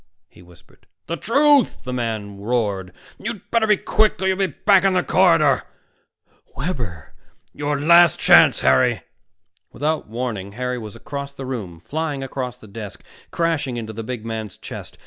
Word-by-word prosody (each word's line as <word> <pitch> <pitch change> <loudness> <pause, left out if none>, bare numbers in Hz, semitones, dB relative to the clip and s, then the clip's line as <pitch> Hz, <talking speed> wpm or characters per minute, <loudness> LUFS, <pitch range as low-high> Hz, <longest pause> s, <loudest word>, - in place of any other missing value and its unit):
he - - -19
whispered. 90 -1 -21 0.2
"The 170 - -3
truth!" 280 - +3
the 125 - -5
man 110 -5 -4
roared. 100 -4 -1 0.3
"You'd 220 -1 -7
better 230 -2 +2
be 210 -1 +4
quick, 215 0 +1
or 190 - -2
you'll 190 - +2
be 195 -1 +1
back 195 +4 +3
in 195 -1 +3
the 180 - +2
corridor." 165 -7 +4 1.0
"Webber!" 120 - -5 0.4
"Your 145 0 -2
last 170 +3 +6
chance, - - +6
Harry." 65 -1 +3 0.7
Without 155 +3 -2
warning, 110 -4 -4
Harry 125 +2 -3
was 110 -3 -9
across 140 -1 -7
the 135 -1 -8
room, 100 -11 -6
flying 150 - -3
across 125 -2 -5
the 110 - -15
desk, 105 0 -9 0.3
crashing 160 -7 -1
into 110 -1 -6
the 115 +1 -6
big 115 -1 -6
man's 110 -3 -5
chest. - - -9
130 Hz, 160 wpm, -21 LUFS, 110-170 Hz, 1.0 s, last